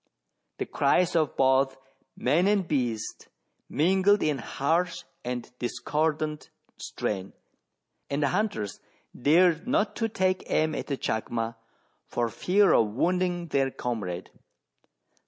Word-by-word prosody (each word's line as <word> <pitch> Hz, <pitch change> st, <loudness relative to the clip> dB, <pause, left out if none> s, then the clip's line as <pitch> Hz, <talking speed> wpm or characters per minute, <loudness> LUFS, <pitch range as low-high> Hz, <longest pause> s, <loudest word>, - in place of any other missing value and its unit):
The -, -, -2 dB
cries 180 Hz, -1 st, +2 dB
of 155 Hz, -3 st, +1 dB
both 135 Hz, 0 st, +3 dB, 0.4 s
man 175 Hz, +5 st, +2 dB
and 200 Hz, -3 st, +2 dB
beast 120 Hz, -7 st, -2 dB, 0.4 s
mingled 190 Hz, +6 st, +3 dB
in 150 Hz, -3 st, +1 dB
harsh 165 Hz, +9 st, -1 dB, 0.2 s
and 125 Hz, -1 st, -4 dB
discordant 150 Hz, +4 st, -1 dB, 0.3 s
strain, 95 Hz, -2 st, -4 dB, 0.8 s
and 140 Hz, +1 st, 0 dB
the 140 Hz, -, +3 dB
hunters 180 Hz, -, -2 dB, 0.4 s
dared 165 Hz, -, +3 dB
not 235 Hz, -4 st, +1 dB
take 190 Hz, -5 st, 0 dB
aim 155 Hz, 0 st, +2 dB
at -, -, -4 dB
the 140 Hz, -, -2 dB
chacma 115 Hz, 0 st, -2 dB, 0.5 s
for 120 Hz, -1 st, -1 dB
fear 195 Hz, -, +3 dB
of 115 Hz, -, +4 dB
wounding 175 Hz, -, 0 dB
their 135 Hz, -2 st, +2 dB
comrade. 100 Hz, -9 st, -4 dB
150 Hz, 115 wpm, -27 LUFS, 120-180 Hz, 0.8 s, of